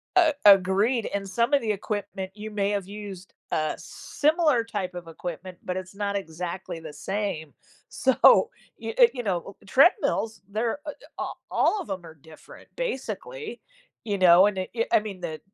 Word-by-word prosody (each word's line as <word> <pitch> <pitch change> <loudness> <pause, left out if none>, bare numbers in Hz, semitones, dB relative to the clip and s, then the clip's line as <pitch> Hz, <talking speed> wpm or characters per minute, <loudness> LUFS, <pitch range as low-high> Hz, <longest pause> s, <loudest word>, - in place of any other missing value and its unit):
A 335 -4 +5
Agreed, 200 +4 +5
and 200 -1 -3
some 235 +7 +1
of 280 - +5
the 220 - 0
equipment, 200 -2 -4
you 215 +1 -7
may 205 -1 0
have 200 -2 -2
used 200 -2 -9 0.2
uh, 155 -1 0
similar 305 -5 +1
type 195 -5 -4
of 175 -1 -7
equipment, 175 +2 -7
but 180 0 -3
it's 185 0 -7
not 200 0 -2
exactly 175 -1 -5
the 160 -2 -9
same, 160 -1 -3 0.4
so, 260 -1 +5 0.3
you - - -5
eh, - - +9
you 250 - -3
know, 195 -3 -3
eh - - -20
eh, - - -19
treadmills, 255 - +3
they're, 225 +6 -1
uh - - -1
eh - - -4 0.3
a - - -1 0.3
all 425 - +2
of 350 - -10
'em 190 -2 -4
are 160 -1 -12
different, 155 +1 -15
basically, - - -5 0.4
you 205 -3 -1
know? 185 +1 +7
And, 200 -2 -2
i 185 - -3
eh, 230 -1 +1
I - - +6
mean, 205 -4 -7
the 160 -3 -5
200 Hz, 185 wpm, -26 LUFS, 185-230 Hz, 0.4 s, eh